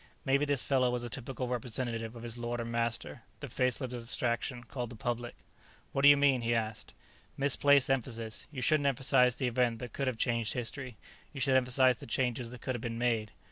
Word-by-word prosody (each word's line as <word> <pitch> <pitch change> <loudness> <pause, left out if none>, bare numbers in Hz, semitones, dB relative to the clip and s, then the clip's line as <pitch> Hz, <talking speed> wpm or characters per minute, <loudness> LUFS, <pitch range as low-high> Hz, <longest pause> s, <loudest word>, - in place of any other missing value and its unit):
Maybe 140 +1 +3
this 145 -3 0
fellow 130 -2 +2
was 120 0 -2
a 120 - -6
typical 130 +1 -4
representative 120 -1 -3
of 115 - -9
his 120 -1 -3
lord 120 0 -3
and 115 0 -4
master, 115 0 -2 0.2
the - - -6
faceless 125 0 -1
abstraction 120 +1 -2
called 120 -1 -5
the 120 - -9
Public. 120 +2 -3 0.6
"What 135 - -1
do 140 - +9
you 145 - +8
mean?" 140 -3 +3
he 120 0 +1
asked. 110 -1 -3 0.4
"Misplaced 140 0 +4
emphasis. 115 -4 -2
You 130 -4 -4
shouldn't 145 +2 +3
emphasize 130 -2 +3
the 130 - -2
event 120 -1 +1
that 120 -1 -8
could 135 - -2
have 130 -3 -1
changed 115 -2 0
history; 125 -1 -5 0.4
you 140 - -6
should 135 -1 +2
emphasize 130 -1 +4
the - - -10
changes 120 0 -1
that 125 0 -10
could 130 - -2
have 120 - -5
been 115 -1 -4
made. 115 -3 0
125 Hz, 205 wpm, -31 LUFS, 115-130 Hz, 0.6 s, do